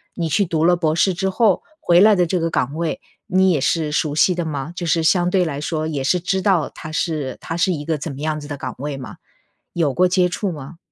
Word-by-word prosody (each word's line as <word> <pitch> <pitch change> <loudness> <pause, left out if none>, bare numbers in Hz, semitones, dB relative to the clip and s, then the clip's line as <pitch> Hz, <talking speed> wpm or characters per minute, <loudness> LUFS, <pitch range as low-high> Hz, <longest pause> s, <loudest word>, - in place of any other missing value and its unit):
你 170 -2 -2
去 200 - +2
读 160 -2 0
了 175 +1 +5
博 160 -3 0
士 185 +3 +2
之 190 +2 -1
后， 205 -1 +2 0.2
回 175 0 +4
来 210 +1 +6
的 180 -2 +3
这 175 +2 -1
个 165 0 0
岗 140 -2 -1
位， 170 - -2 0.3
你 190 0 +3
也 150 -6 +1
是 155 0 0
熟 150 -1 -1
悉 180 +4 +4
的 175 -1 -3
吗？ 150 +1 -4
就 175 -1 -4
是 165 0 +2
相 175 +2 +3
对 185 -1 +2
来 145 -3 -4
说 155 0 -2
也 145 -4 -3
是 180 +7 +2
知 190 +2 -1
道 185 -6 +1
它 155 - -9
是 155 -5 -2
它 165 - -5
是 180 +2 +1
一 150 -4 -4
个 160 -3 -1
怎 150 +1 -5
么 135 - -8
样 155 0 -1
子 145 - -9
的 145 - -5
岗 - - -5
位 145 -1 -4
吗？ 130 - -9 0.6
有 155 -6 0
过 180 +1 +3
接 180 0 +2
触 185 +2 -3
吗？ 150 +1 -9
165 Hz, 280 characters per minute, -20 LUFS, 150-180 Hz, 0.6 s, 来